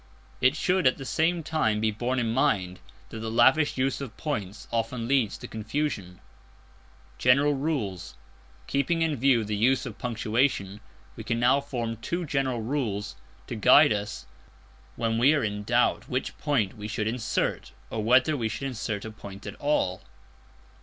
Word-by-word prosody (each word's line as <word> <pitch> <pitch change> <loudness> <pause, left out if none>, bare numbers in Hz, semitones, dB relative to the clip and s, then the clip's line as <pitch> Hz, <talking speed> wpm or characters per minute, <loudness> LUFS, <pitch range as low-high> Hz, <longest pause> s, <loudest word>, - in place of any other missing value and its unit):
It 130 +3 +4
should 180 -1 +2
at 130 - +2
the 135 - -7
same 165 +4 +1
time 130 -10 0
be 110 0 +1
borne 120 +4 -2
in 115 -2 0
mind 100 -9 +1 0.3
that 110 - -7
the 110 0 -4
lavish 130 +7 +4
use 135 +1 0
of 130 -6 -7
points 105 - -4
often 115 0 -2
leads 130 -5 +1
to - - -9
confusion. 110 -5 -3 1.0
General 140 +4 +4
Rules. 135 - -3 0.5
Keeping 165 +4 0
in 160 -2 0
view 130 -2 +3
the 105 0 -2
use 125 +5 +2
of 115 -4 -8
punctuation, 115 -3 0 0.4
we 110 - -7
can 115 +1 -1
now 125 +4 +4
form 120 -5 -4
two 170 +10 -3
general 135 -5 -1
rules 110 -6 -2 0.3
to - - -6
guide - - +6
us 100 - -5 0.7
when 115 -1 0
we 140 +6 +5
are 145 - 0
in 105 -1 -2
doubt 120 +3 +1
which 130 +1 -2
point 130 -11 0
we 105 -1 -6
should 110 -1 -2
insert, 115 0 -1 0.2
or 110 - -2
whether 130 +7 +4
we 115 -5 -1
should 135 - -5
insert 110 -5 -3
a 110 - -6
point 100 -1 -11
at 100 - -5
all. 145 -11 0
120 Hz, 165 wpm, -27 LUFS, 110-140 Hz, 1.0 s, guide